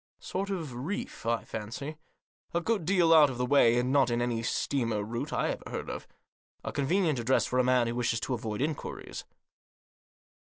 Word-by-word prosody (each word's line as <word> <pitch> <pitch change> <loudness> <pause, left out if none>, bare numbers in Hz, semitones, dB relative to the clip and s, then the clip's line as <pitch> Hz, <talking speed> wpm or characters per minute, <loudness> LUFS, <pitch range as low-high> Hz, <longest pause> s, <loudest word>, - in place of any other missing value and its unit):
Sort 195 +2 -3
of 165 -9 -3
reef, 185 - -5
I 115 0 +1
fancy. 115 +8 -6 0.6
A - - +4
good 200 -1 -1
deal 175 -2 +4
out 155 -3 +8
of 130 - -5
the 125 - 0
way, 125 -3 +5
and 125 +1 +1
not 135 -3 +4
in 120 0 0
any 120 -1 0
steamer 115 -2 -1
route 115 +3 -4
I - - 0
ever - - -4
heard - - -4
of. - - -7 0.6
A - - -3
convenient 155 0 +1
address 125 +3 +2
for 125 - 0
a - - +5
man 125 -1 +3
who 115 - -2
wishes 120 -2 0
to 130 - -2
avoid 115 0 -2
inquiries." 155 0 -5
130 Hz, 190 wpm, -29 LUFS, 120-160 Hz, 0.6 s, out